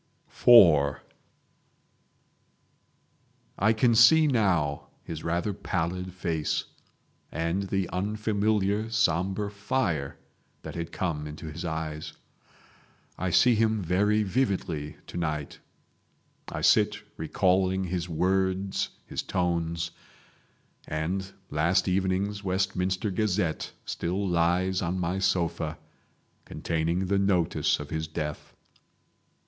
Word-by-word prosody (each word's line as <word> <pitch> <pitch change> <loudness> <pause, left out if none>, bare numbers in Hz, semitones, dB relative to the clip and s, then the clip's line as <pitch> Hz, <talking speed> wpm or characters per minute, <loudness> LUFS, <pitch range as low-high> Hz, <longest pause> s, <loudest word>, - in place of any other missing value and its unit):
IV 80 - +8 2.6
I 110 +4 +4
can 115 +2 +3
see 155 +8 +7
now 95 - +1 0.2
his 80 -2 -7
rather 85 +5 -1
pallid 90 +1 -3
face, 85 -4 -2 0.7
and 85 +5 -2
the 95 -2 0
unfamiliar 105 +1 0
sombre 100 -1 0
fire 100 - -2 0.5
that - - -7
had 85 -1 -5
come 75 -5 -2
into 75 +1 -8
his 80 +3 -7
eyes. 80 -1 -4 1.1
I 95 - -1
see 120 +8 +5
him 110 -2 +1
very 105 +5 +2
vividly 95 - -1
to - - -8
night. 75 -4 -3 0.9
I - - -4
sit - - +4 0.2
recalling 95 +3 +1
his 90 -1 -3
words, 95 +3 0 0.2
his - - -4
tones, 85 -2 -1 1.0
and 90 +5 -3 0.2
last 80 +6 +2
evening's 95 +2 0
Westminster 95 +1 -1
Gazette 95 -4 -1
still 95 +4 -2
lies 90 +2 +1
on 90 +1 -1
my 90 +1 -1
sofa, 85 -4 0 0.7
containing 85 +3 -1
the 100 +1 +1
notice 95 -4 +1
of 75 0 -8
his 80 0 -2
death. 75 -1 -5
90 Hz, 100 wpm, -27 LUFS, 85-100 Hz, 2.6 s, IV